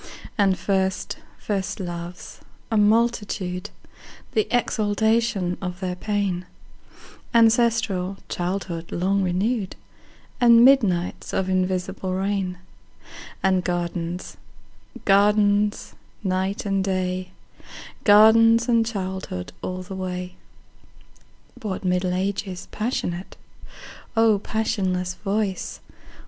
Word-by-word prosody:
And 195 -3 +3
first 190 +1 -1 0.2
first 195 -3 -3
loves, 175 -1 -7 0.3
a - - +1
multitude, 210 -4 +1 0.6
The 430 - +1
exaltation 220 -4 +1
of 180 -1 -4
their 185 -2 -3
pain; 190 -2 -2 0.9
Ancestral 225 -5 +3
childhood 175 -2 -3
long 195 +3 +1
renewed; 195 +3 0 0.6
And 235 -1 +7
midnights 205 -10 +2
of 190 -1 0
invisible 185 0 -1
rain; 190 -1 -1 0.9
And 190 -1 +3
gardens, 175 0 -3 0.7
gardens, 205 +1 +3 0.3
night 190 +1 -1
and 195 -1 +1
day, 185 -1 -1 0.7
Gardens 225 +2 +6
and 230 -2 +4
childhood 190 - -4
all 185 0 -4
the 185 - -8
way. 180 -1 -4 1.3
What 195 -3 -4
Middle 180 0 +1
Ages 190 -1 -3
passionate,O 215 +1 -2
passionless 190 -4 -1
voice! 200 -1 -2
190 Hz, 85 wpm, -24 LUFS, 180-215 Hz, 1.3 s, And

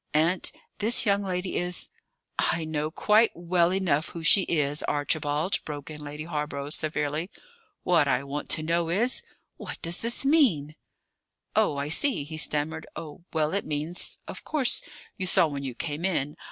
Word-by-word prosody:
Aunt, 165 +4 +3 0.3
this 220 +3 +3
young 200 -1 +3
lady 185 -1 -2
is 175 -1 -2 0.3
" - - -38 0.2
"I 165 -1 -3
know 155 -1 -2
quite 215 +7 +4
well 175 0 +2
enough 175 -5 +1
who 170 - -7
she 180 +5 +7
is, 150 -2 +1
Archibald," 150 +3 0
broke 145 0 -6
in 150 -1 -8
Lady 150 +1 -6
Hawborough 150 -3 -3
severely. 150 +2 0 0.5
"What 165 -5 +4
I 130 -1 +2
want 140 +1 -5
to 155 - +3
know 165 +1 +1
is 225 +9 +1 0.4
What - - -7
does 170 +1 0
this 235 +4 -2
mean?" 210 - +3 0.8
"Oh, 145 - +3
I 140 +1 -2
see!" 240 - +2
he 155 +2 -7
stammered. 155 +1 0
"Oh, 155 +1 -8
well, 155 -1 +1
it 200 - 0
means 155 +4 -2
of - - -7
course, 285 -6 +1 0.4
you 185 - -1
saw 175 - +5
when 140 -2 -4
you 130 -3 -5
came 150 +3 -4
in? 150 -6 0
160 Hz, 170 wpm, -27 LUFS, 150-180 Hz, 0.8 s, she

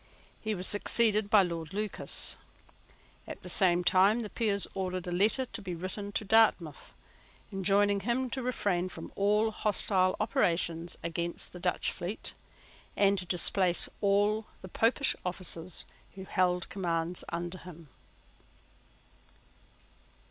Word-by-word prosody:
He 215 -1 -2
was 180 0 -2
succeeded 210 0 +2
by 210 -2 +6
Lord 170 -1 -5
Lucas. 210 0 -1 0.9
At - - -9
the - - -6
same 180 -3 +4
time 195 +6 +4
the 210 - -6
Peers 205 -4 0
ordered 185 -2 -3
a 175 - -5
letter 210 +9 +2
to 230 -2 -7
be 180 -3 -5
written 190 +4 -5
to 215 - -2
Dartmouth, 200 -8 +2 0.6
enjoining 200 +1 +2
him 240 +5 -1
to 265 - -3
refrain 200 -7 -1
from - - -9
all 210 +2 +2
hostile 190 -3 +2
operations 170 -5 0
against 170 +1 -3
the 180 - -9
Dutch 180 0 0
fleet, 180 +5 -5 0.6
and 200 0 +4
to 180 - -6
displace 180 +1 +3
all 205 +2 +2 0.2
the 185 - -8
Popish 235 +8 +2
officers 180 -1 -4 0.3
who 190 - -8
held 180 -2 0
commands 170 -2 -2
under 175 +2 -5
him. 170 -4 -12
190 Hz, 130 wpm, -30 LUFS, 175-210 Hz, 0.9 s, by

